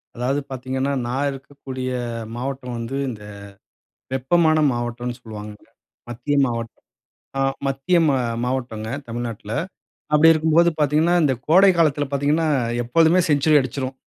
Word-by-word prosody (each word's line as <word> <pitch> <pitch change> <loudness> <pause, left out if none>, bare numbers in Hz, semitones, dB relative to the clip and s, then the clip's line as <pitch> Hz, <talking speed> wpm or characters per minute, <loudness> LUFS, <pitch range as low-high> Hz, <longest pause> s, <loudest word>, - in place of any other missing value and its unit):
அதாவது 125 +4 0
பாத்தீங்கன்னா, 130 +2 -2
நான் 135 +4 -1
இருக்கக்கூடிய 135 -1 -7 0.5
மாவட்டம் 125 0 -5
வந்து, 115 +4 -4
இந்த 105 -4 -8 0.9
வெப்பமான 155 +4 +3
மாவட்டம்னு 120 0 -4
சொல்வாங்க. 105 -2 -8 0.6
மத்திய 120 +5 -2
மாவட் 115 -2 -4 0.7
அ, - - +2 0.3
மத்திய 135 +7 +1
மா 145 -3 +3 0.3
மாவட்டங்க. 120 -4 -3 0.2
தமிழ்நாட்ல. 115 -2 -5 0.6
அப்பிடி 155 +2 +7
இருக்கும்போது 160 +2 +3
பாத்தீங்கன்னா, 155 +4 +3
இந்த 140 -3 +3
கோடை 190 +5 +6
காலத்தில 145 -3 +2
பாத்தீங்கன்னா, 145 +3 +1 0.4
எப்பொழுதுமே 165 +8 +4
செஞ்சுரி 150 +1 +3
அடுச்சுரும். 130 0 -3
135 Hz, 115 wpm, -22 LUFS, 120-150 Hz, 0.9 s, அப்பிடி